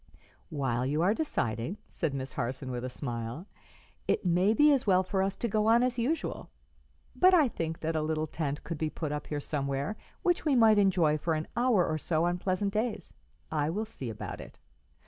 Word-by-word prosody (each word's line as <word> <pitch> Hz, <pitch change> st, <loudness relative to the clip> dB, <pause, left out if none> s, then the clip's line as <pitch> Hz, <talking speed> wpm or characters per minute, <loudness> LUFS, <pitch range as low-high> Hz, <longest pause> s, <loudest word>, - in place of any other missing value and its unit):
"While 130 Hz, -5 st, -1 dB
you 150 Hz, +5 st, 0 dB
are 195 Hz, +4 st, +4 dB
deciding," 125 Hz, -, -2 dB
said 160 Hz, -4 st, -2 dB
Miss 130 Hz, 0 st, -5 dB
Harson, 130 Hz, +2 st, -3 dB
with 125 Hz, 0 st, -4 dB
a 130 Hz, -, -3 dB
smile, 120 Hz, +4 st, -5 dB, 0.6 s
"it -, -, +1 dB
may 180 Hz, +3 st, +3 dB
be 295 Hz, +6 st, +5 dB
as 270 Hz, -6 st, +1 dB
well 185 Hz, -1 st, +5 dB
for 190 Hz, +1 st, -1 dB
us 195 Hz, 0 st, 0 dB
to 235 Hz, -, -2 dB
go 215 Hz, 0 st, +1 dB
on 230 Hz, +2 st, +5 dB
as 250 Hz, -1 st, 0 dB
usual; 290 Hz, +8 st, -2 dB, 0.7 s
but 370 Hz, 0 st, +6 dB
I 310 Hz, -6 st, +5 dB
think 165 Hz, -7 st, -4 dB
that 160 Hz, 0 st, -1 dB
a 155 Hz, -, +1 dB
little 155 Hz, 0 st, -1 dB
tent 150 Hz, -2 st, -3 dB
could 160 Hz, 0 st, -5 dB
be 155 Hz, -, 0 dB
put 155 Hz, -1 st, -4 dB
up 150 Hz, 0 st, -4 dB
here 150 Hz, -, -2 dB
somewhere, 140 Hz, +4 st, -2 dB, 0.3 s
which 350 Hz, -1 st, +2 dB
we 295 Hz, -4 st, +2 dB
might 220 Hz, -3 st, +6 dB
enjoy 175 Hz, -6 st, +3 dB
for 160 Hz, +1 st, 0 dB
an 155 Hz, 0 st, -3 dB
hour 235 Hz, -6 st, +3 dB
or 155 Hz, 0 st, -1 dB
so 160 Hz, +1 st, 0 dB
on 175 Hz, 0 st, 0 dB
pleasant 195 Hz, +2 st, -1 dB
days. 220 Hz, +1 st, -2 dB, 0.4 s
I 150 Hz, -1 st, 0 dB
will 210 Hz, +7 st, -2 dB
see 140 Hz, -, -6 dB
about 110 Hz, -, -6 dB
it." -, -, -12 dB
165 Hz, 205 wpm, -30 LUFS, 145-215 Hz, 0.7 s, but